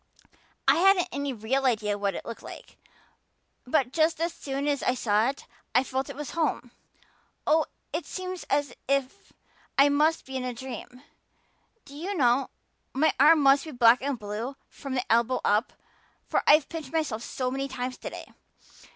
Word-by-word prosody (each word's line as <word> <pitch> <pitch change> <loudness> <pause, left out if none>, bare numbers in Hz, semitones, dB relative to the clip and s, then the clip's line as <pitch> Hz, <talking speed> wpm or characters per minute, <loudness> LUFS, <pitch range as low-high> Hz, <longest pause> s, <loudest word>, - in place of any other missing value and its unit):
I - - +6
hadn't 375 0 +4
any 280 0 -2
real 250 +3 -1
idea 215 -4 +1
what 200 -2 -1
it - - -6
looked 230 - -7
like. - - -12 0.9
But 255 -2 +1
just 320 0 +2
as 335 +1 -1
soon 275 -1 -4
as 285 -2 0
I 250 - +1
saw 215 0 +2
it 275 - -7 0.3
I 250 - +5
felt 265 +1 -3
it 280 - -7
was 295 0 -6
home. 310 -7 -1 0.7
Oh, 315 +1 +3 0.3
it 325 +2 -3
seems 370 -1 -5
as 285 -3 0
if 275 -1 -1 0.5
I 280 +1 +6
must 305 +3 +2
be 265 - -8
in 260 - -2
a 250 -1 -4
dream. 250 +1 -8 0.8
Do 280 0 -13
you 365 +7 -4
know, 255 0 +3 0.5
my 305 +4 +3
arm 305 +2 +7
must 275 0 +5
be - - -7
black 240 -2 +5
and 275 -1 -2
blue 220 +5 -5
from 275 -2 -6
the 250 - -1
elbow 235 +2 +2
up, 210 +4 +2 0.5
for - - +1
I've 295 -1 +6
pinched 315 -5 -7
myself 305 -9 -1
so 255 +1 -3
many 270 +1 -2
times 255 -1 -5
today. - - -7
270 Hz, 175 wpm, -27 LUFS, 245-295 Hz, 0.9 s, arm